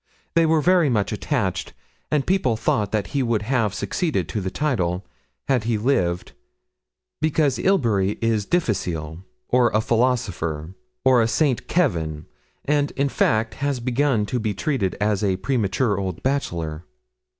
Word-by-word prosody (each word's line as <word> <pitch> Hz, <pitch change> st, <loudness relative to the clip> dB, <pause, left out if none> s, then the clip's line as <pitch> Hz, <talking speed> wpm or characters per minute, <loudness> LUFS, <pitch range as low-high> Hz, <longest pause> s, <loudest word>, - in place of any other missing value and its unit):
They 165 Hz, -1 st, +4 dB
were 160 Hz, -1 st, +3 dB
very 175 Hz, -1 st, +4 dB
much 105 Hz, -6 st, 0 dB
attached, -, -, -2 dB, 0.4 s
and 150 Hz, -3 st, +1 dB
people 155 Hz, -, +1 dB
thought 105 Hz, -2 st, 0 dB
that 105 Hz, -2 st, -1 dB
he 140 Hz, -, +1 dB
would 115 Hz, -4 st, 0 dB
have 115 Hz, -3 st, +1 dB
succeeded 170 Hz, -5 st, -1 dB
to 105 Hz, -, -2 dB
the 95 Hz, -, -2 dB
title, 95 Hz, -, -1 dB, 0.4 s
had 125 Hz, -5 st, +1 dB
he 115 Hz, -1 st, +1 dB
lived, 95 Hz, -7 st, 0 dB, 0.9 s
because 155 Hz, -4 st, +2 dB
Ilbury 110 Hz, -, +2 dB
is 110 Hz, -3 st, 0 dB
difficile 85 Hz, -, -1 dB, 0.3 s
or 125 Hz, -1 st, +4 dB
a 110 Hz, -, +1 dB
philosopher 100 Hz, -10 st, 0 dB, 0.3 s
or 130 Hz, -2 st, +6 dB
a 110 Hz, -, +2 dB
Saint 125 Hz, +3 st, +1 dB
Kevin; 80 Hz, -, 0 dB, 0.4 s
and, 145 Hz, 0 st, +2 dB
in 140 Hz, +1 st, +1 dB
fact, 110 Hz, -3 st, +1 dB
has 140 Hz, -2 st, 0 dB
begun 125 Hz, -2 st, +1 dB
to 125 Hz, +4 st, -2 dB
be 110 Hz, -3 st, -2 dB
treated 100 Hz, -, -1 dB
as 105 Hz, -1 st, +1 dB
a 95 Hz, -2 st, +1 dB
premature 105 Hz, -1 st, 0 dB
old 95 Hz, -3 st, -4 dB
bachelor.' 85 Hz, -, -2 dB
115 Hz, 150 wpm, -23 LUFS, 95-140 Hz, 0.9 s, or